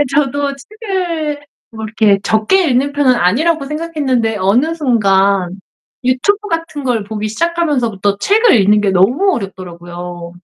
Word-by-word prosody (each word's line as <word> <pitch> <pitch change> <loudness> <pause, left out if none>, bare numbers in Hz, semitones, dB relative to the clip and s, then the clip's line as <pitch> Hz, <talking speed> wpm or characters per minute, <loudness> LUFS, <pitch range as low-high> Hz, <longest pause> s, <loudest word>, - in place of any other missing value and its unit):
예. - - +4
저도 285 0 0
책을 340 - -4 0.3
뭐 220 -1 -7
이렇게 215 -2 +2
적게 220 - +2
읽는 270 +3 +1
편은 280 -3 +3
아니라고 275 - +1
생각했는데 285 -8 -1
어느 245 - +1
순간 200 - +2 0.5
YouTube 255 +12 +1
같은 330 -3 -4
걸 240 -5 -1
보기 215 0 -4
시작하면서부터 240 - -1
책을 425 - +4
읽는 210 +2 +3
게 200 -2 +1
너무 250 - +2
어렵더라고요. 175 -3 -8
250 Hz, 345 characters per minute, -15 LUFS, 200-315 Hz, 0.5 s, 예